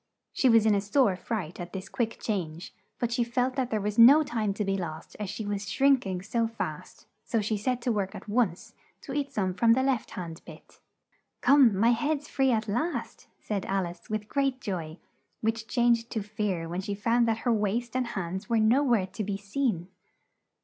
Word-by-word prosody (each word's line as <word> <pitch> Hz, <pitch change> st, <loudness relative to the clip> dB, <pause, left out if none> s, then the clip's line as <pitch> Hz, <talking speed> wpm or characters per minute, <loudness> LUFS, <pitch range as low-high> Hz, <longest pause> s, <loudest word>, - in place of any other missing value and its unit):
She 260 Hz, -, +3 dB
was 225 Hz, -2 st, +5 dB
in 215 Hz, -, +5 dB
a 200 Hz, -, +2 dB
sore 205 Hz, 0 st, +2 dB
fright 180 Hz, -3 st, -4 dB
at 175 Hz, 0 st, -7 dB
this 190 Hz, 0 st, -5 dB
quick 230 Hz, 0 st, -2 dB
change, 175 Hz, -5 st, -4 dB, 0.2 s
but 240 Hz, -1 st, -1 dB
she 240 Hz, -, +2 dB
felt 250 Hz, +2 st, -1 dB
that 260 Hz, -2 st, -1 dB
there 215 Hz, -, 0 dB
was 210 Hz, +2 st, -2 dB
no 280 Hz, +7 st, +9 dB
time 225 Hz, -7 st, -1 dB
to 210 Hz, -, -2 dB
be 195 Hz, 0 st, 0 dB
lost 165 Hz, -4 st, -6 dB
as 205 Hz, -2 st, -3 dB
she 220 Hz, +2 st, -5 dB
was 205 Hz, -1 st, -3 dB
shrink 270 Hz, -5 st, +3 dB
ing 185 Hz, -1 st, -3 dB
so 230 Hz, +2 st, 0 dB
fast; 225 Hz, 0 st, -6 dB, 0.2 s
so 230 Hz, -, 0 dB
she 215 Hz, +1 st, -1 dB
set 240 Hz, +4 st, -2 dB
to 245 Hz, -, +1 dB
work 200 Hz, -3 st, -2 dB
at -, -, -9 dB
once 205 Hz, -5 st, 0 dB, 0.3 s
to 270 Hz, -, -7 dB
eat 285 Hz, -1 st, -2 dB
some 190 Hz, -3 st, -1 dB
from 230 Hz, +4 st, +4 dB
the 260 Hz, +2 st, +2 dB
left 265 Hz, -4 st, 0 dB
hand 170 Hz, -2 st, -6 dB
bit. -, -, -14 dB, 0.6 s
"Come, 265 Hz, -8 st, +5 dB
my 230 Hz, +4 st, +4 dB
head's 290 Hz, +5 st, 0 dB
free 270 Hz, -3 st, +1 dB
at 220 Hz, -3 st, +1 dB
last!" 245 Hz, +12 st, -3 dB
said 200 Hz, -3 st, -3 dB
Al 195 Hz, -1 st, 0 dB
ice, 170 Hz, 0 st, -10 dB
with 215 Hz, -1 st, -3 dB
great 275 Hz, +1 st, 0 dB
joy, 170 Hz, -8 st, -4 dB, 0.4 s
which 225 Hz, 0 st, -1 dB
changed 235 Hz, -1 st, +2 dB
to 220 Hz, -4 st, -2 dB
fear 205 Hz, -5 st, -2 dB
when 175 Hz, +3 st, -3 dB
she 200 Hz, +1 st, -4 dB
found 230 Hz, +3 st, +2 dB
that 225 Hz, -1 st, +1 dB
her 240 Hz, -, +4 dB
waist 225 Hz, +3 st, -1 dB
and 255 Hz, -1 st, 0 dB
hands 190 Hz, -2 st, -4 dB
were 230 Hz, -, +2 dB
no 225 Hz, +6 st, +4 dB
where 235 Hz, -8 st, +2 dB
to 195 Hz, +3 st, -5 dB
be 200 Hz, 0 st, -2 dB
seen. 200 Hz, -3 st, -2 dB
220 Hz, 210 wpm, -28 LUFS, 195-240 Hz, 0.6 s, no